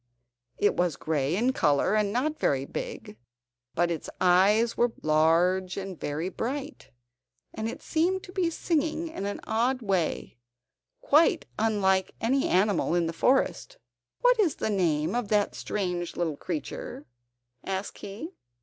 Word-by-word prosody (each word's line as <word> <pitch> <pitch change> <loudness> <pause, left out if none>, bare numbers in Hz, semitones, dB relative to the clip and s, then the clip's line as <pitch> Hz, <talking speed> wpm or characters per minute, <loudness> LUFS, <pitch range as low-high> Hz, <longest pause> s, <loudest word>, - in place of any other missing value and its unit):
It 205 - +3
was 175 -4 +1
grey 150 0 -1
in 245 +6 +1
colour, 145 - +2
and 210 -2 +2
not 295 +7 -1
very 135 -1 +1
big; 105 - -6 0.6
but 175 +1 +2
its 165 - -4
eyes 200 +6 +4
were 240 0 +2
large 170 +4 +2
and 190 -3 -6
very 150 +4 -3
bright, 275 +9 -5 0.6
and 220 - -3
it - - -8
seemed 360 +4 0
to - - -10
be 365 -3 0
singing 325 0 -1
in 200 -11 -4
an 205 - -4
odd 240 +3 0
way, 185 - -1 0.6
quite 315 +2 +4
unlike 195 -4 +1
any 265 +4 +1
animal 185 -2 +2
in 175 -1 +2
the 165 - -3
forest. 270 - +1 0.4
"What - - +4
is 365 -8 +3
the 220 - -2
name 160 -5 +1
of 240 -3 -1
that 205 -1 +1
strange 180 -4 -3
little 165 -4 -1
creature?" 150 -2 -6 0.6
asked 195 +1 -4
he. 215 - -7
200 Hz, 145 wpm, -27 LUFS, 175-260 Hz, 0.6 s, eyes